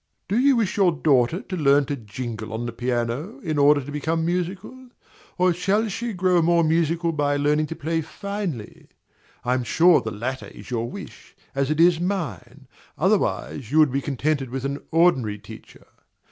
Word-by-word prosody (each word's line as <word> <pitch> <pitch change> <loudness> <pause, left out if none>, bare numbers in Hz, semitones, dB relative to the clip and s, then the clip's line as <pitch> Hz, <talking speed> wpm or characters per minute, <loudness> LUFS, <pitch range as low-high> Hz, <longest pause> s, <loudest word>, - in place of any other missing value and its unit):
Do 210 +5 +1
you 275 +1 +5
wish 220 -3 0
your 190 -3 +4
daughter 145 - +2
to 190 - -5
learn 145 -3 +4
to 145 - -3
jingle 110 -1 -6
on 115 +2 -3
the 120 - -3
piano, 120 - -2
in 155 -4 -2
order 145 0 +5
to 140 +2 -8
become 160 +3 -1
musical? 185 +9 -4 0.5
or 180 -1 +3
shall 200 +6 +1
she 235 +4 -3
grow 180 -2 +2
more 170 +1 +3
musical 165 +1 +1
by 145 -2 0
learning 150 +2 +1
to 165 - -6
play 165 +2 -1
finely? 180 - -6 0.6
I 125 - +2
am 130 -1 0
sure 170 +6 +4
the 110 - -4
latter 120 +5 -4
is - - -12
your 120 -1 -2
wish, - - -11 0.2
as 135 0 0
it 155 +1 -1
is 170 -1 +5
mine: 175 - -4 0.3
otherwise, 80 - 0
you 155 - +1
would 155 -4 +5
be 140 +2 0
contented 140 0 -1
with 130 +1 -4
an 140 +1 -2
ordinary 135 -11 +2
teacher. 105 - -13
155 Hz, 180 wpm, -23 LUFS, 130-175 Hz, 0.6 s, you